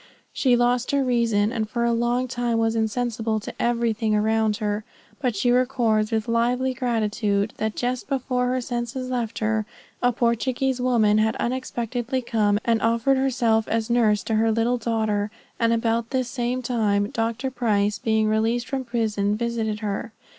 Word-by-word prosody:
She 255 -3 +3
lost 245 +1 +1
her 280 -1 +2
reason, 230 -4 +2
and 220 -3 -2
for 235 +2 -1
a 235 - +2
long 240 +2 0
time 240 -2 -1
was 225 0 +1
insensible 225 0 -1
to 210 - -7
everything 230 -2 +1
around 220 0 +1
her. 210 -1 -2 0.4
But 250 -5 0
she 240 +5 +2
records 245 -4 +2
with 220 0 -1
lively 245 +3 +1
gratitude, 215 -4 0
that 220 -1 -2
just 250 +1 -2
before 255 -2 0
her 255 0 0
senses 245 +1 -4
left 235 -3 -2
her, 215 -1 0 0.3
a 245 - +3
Portuguese 245 +2 0
woman 220 -4 +3
had 220 +1 +2
unexpectedly 245 0 -2
come 210 -3 +1
and 230 -1 +2
offered 230 +4 +2
herself 235 -4 +1
as 225 +1 -1
nurse 215 -4 +3
to 225 - -2
her 225 +1 +3
little 230 +3 +1
daughter; 220 -2 0 0.3
and 230 -1 +3
about 230 0 0
the 260 -1 0
same 245 +1 -2
time, 210 -4 0
Dr. 230 +3 -2
Price, 210 -5 0
being 220 0 +1
released 225 +3 +1
from 265 -1 -2
prison, 215 -4 0
visited 225 -2 -2
her. 210 +2 -3
230 Hz, 165 wpm, -24 LUFS, 220-245 Hz, 0.4 s, She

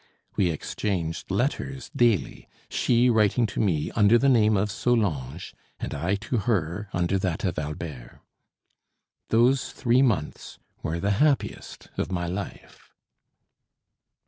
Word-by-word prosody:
We 90 - +2
exchanged 85 +1 -3
letters 130 +4 -2
daily, 120 -6 +1 0.2
she 120 +1 +3
writing 110 +1 +3
to 105 - -4
me 85 -9 0
under 105 +1 +5
the 140 +3 +3
name 110 -4 +4
of 100 +2 0
Solange, 90 - -1 0.3
and - - -4
I 85 +7 0
to 105 +5 -3
her 100 -2 -1
under 90 +2 0
that 90 -4 -2
of 90 -5 -1
Albert. 75 -4 -7 1.1
Those 125 +4 +3
three 125 0 +2
months 100 - -1 0.2
were 80 +2 -2
the 100 +3 0
happiest 150 -3 0
of - - -2
my 85 -1 -1
life. 90 +3 -7
100 Hz, 125 wpm, -26 LUFS, 85-120 Hz, 1.1 s, under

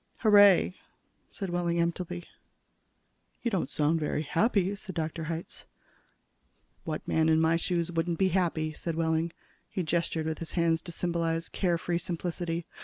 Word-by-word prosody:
"Hooray," 205 -5 +6 0.6
said 195 -4 -5
Wehling 170 -1 0
emptily. 175 +1 -2 1.2
"You 235 - 0
don't 190 -4 0
sound 155 +2 +1
very 150 0 -1
happy," 200 +4 +1
said 190 -2 -8
Dr. 160 0 -3
Hitz. 165 +1 -6 1.2
"What 155 -2 -4
man 160 0 +3
in 160 0 +4
my 160 +1 +3
shoes 170 0 0
wouldn't 165 0 -1
be 190 +2 +3
happy?" 165 -4 0
said 165 +1 -4
Wehling. 165 0 +1 0.4
He 185 - -2
gestured 165 -1 0
with 160 0 -2
his 165 - -5
hands 165 -2 +2
to 175 - -6
symbolize 165 -1 -1
care 175 -3 +1
free 170 0 -1
simplicity. 170 -1 -3
170 Hz, 150 wpm, -29 LUFS, 160-180 Hz, 1.2 s, Hooray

